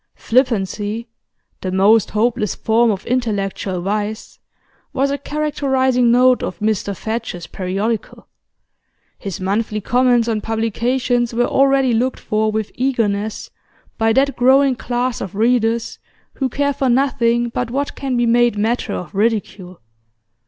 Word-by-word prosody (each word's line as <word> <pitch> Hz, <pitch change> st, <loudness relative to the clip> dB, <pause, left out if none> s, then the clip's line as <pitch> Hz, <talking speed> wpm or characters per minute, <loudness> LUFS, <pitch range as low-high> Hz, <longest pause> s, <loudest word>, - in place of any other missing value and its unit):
Flippancy, 225 Hz, -2 st, -1 dB, 0.5 s
the 185 Hz, -, -3 dB
most 200 Hz, +3 st, +4 dB
hopeless 215 Hz, -2 st, 0 dB
form 230 Hz, +1 st, +2 dB
of 200 Hz, -2 st, -2 dB
intellectual 200 Hz, -6 st, -2 dB
vice, 210 Hz, +3 st, -4 dB, 0.5 s
was 275 Hz, +1 st, +1 dB
a 280 Hz, -, -1 dB
characterising 265 Hz, -4 st, +1 dB
note 250 Hz, +1 st, +4 dB
of -, -, -4 dB
Mr 210 Hz, -2 st, -1 dB
Fadge's 220 Hz, -6 st, -4 dB
periodical; 200 Hz, +6 st, -3 dB, 0.9 s
his 195 Hz, -4 st, -6 dB
monthly 210 Hz, +3 st, -1 dB
comments 245 Hz, +1 st, +2 dB
on 220 Hz, -2 st, -1 dB
publications 235 Hz, +2 st, -1 dB
were 240 Hz, +1 st, +2 dB
already 270 Hz, -2 st, +3 dB
looked 250 Hz, +3 st, 0 dB
for 215 Hz, 0 st, 0 dB
with 215 Hz, -1 st, -3 dB
eagerness 220 Hz, -5 st, -1 dB, 0.5 s
by 225 Hz, 0 st, +3 dB
that 275 Hz, +4 st, +2 dB
growing 265 Hz, +2 st, +4 dB
class 245 Hz, 0 st, -2 dB
of 195 Hz, -, -6 dB
readers 230 Hz, +1 st, +1 dB, 0.3 s
who 265 Hz, -2 st, -2 dB
care 285 Hz, +3 st, 0 dB
for 265 Hz, -1 st, 0 dB
nothing 240 Hz, -2 st, +2 dB
but 245 Hz, 0 st, -3 dB
what 280 Hz, +4 st, -2 dB
can 265 Hz, -3 st, -3 dB
be 240 Hz, -, +2 dB
made 240 Hz, -1 st, +3 dB
matter 220 Hz, 0 st, -1 dB
of 175 Hz, -4 st, -6 dB
ridicule. 200 Hz, -, -2 dB
230 Hz, 130 wpm, -19 LUFS, 210-255 Hz, 0.9 s, most